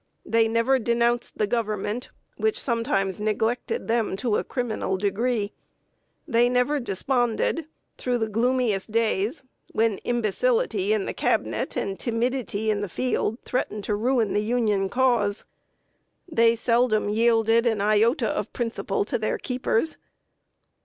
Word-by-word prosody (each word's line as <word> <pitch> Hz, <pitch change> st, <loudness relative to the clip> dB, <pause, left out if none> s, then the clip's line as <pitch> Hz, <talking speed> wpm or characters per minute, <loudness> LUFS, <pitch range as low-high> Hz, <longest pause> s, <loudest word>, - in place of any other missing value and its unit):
They 225 Hz, 0 st, +3 dB
never 230 Hz, +4 st, +2 dB
denounced 235 Hz, +1 st, 0 dB
the 210 Hz, -, +2 dB
Government, 215 Hz, +1 st, -2 dB, 0.3 s
which 440 Hz, -1 st, 0 dB
sometimes 230 Hz, -6 st, 0 dB
neglected 220 Hz, -, -1 dB
them 225 Hz, -4 st, +1 dB
to 215 Hz, +1 st, 0 dB
a -, -, -1 dB
criminal 220 Hz, -6 st, -2 dB
degree. 205 Hz, +2 st, -1 dB, 0.7 s
They 240 Hz, -3 st, +3 dB
never 250 Hz, +4 st, +2 dB
desponded, 245 Hz, -, 0 dB, 0.3 s
through 250 Hz, -1 st, 0 dB
the 220 Hz, -2 st, -1 dB
gloomiest 225 Hz, -2 st, 0 dB
days, 225 Hz, -, 0 dB, 0.3 s
when 220 Hz, -2 st, +1 dB
imbecility 395 Hz, -, 0 dB
in 425 Hz, -3 st, +1 dB
the -, -, -3 dB
Cabinet -, -, -1 dB
and 195 Hz, -1 st, -3 dB
timidity 230 Hz, -2 st, -1 dB
in 205 Hz, -1 st, -1 dB
the 205 Hz, -, -3 dB
field 230 Hz, +1 st, -1 dB
threatened 215 Hz, -4 st, -2 dB
to 210 Hz, -, 0 dB
ruin 230 Hz, 0 st, +1 dB
the 205 Hz, -, +2 dB
Union 210 Hz, -4 st, +1 dB
Cause. 235 Hz, -5 st, +1 dB, 0.8 s
They 230 Hz, -8 st, +3 dB
seldom 230 Hz, -2 st, +2 dB
yielded 225 Hz, +1 st, +3 dB
an 220 Hz, -3 st, +1 dB
iota 215 Hz, +6 st, +3 dB
of -, -, -3 dB
principle 230 Hz, -5 st, -2 dB
to 240 Hz, +1 st, -2 dB
their 215 Hz, -, -1 dB
keepers. 255 Hz, +3 st, -1 dB
230 Hz, 130 wpm, -25 LUFS, 210-250 Hz, 0.8 s, They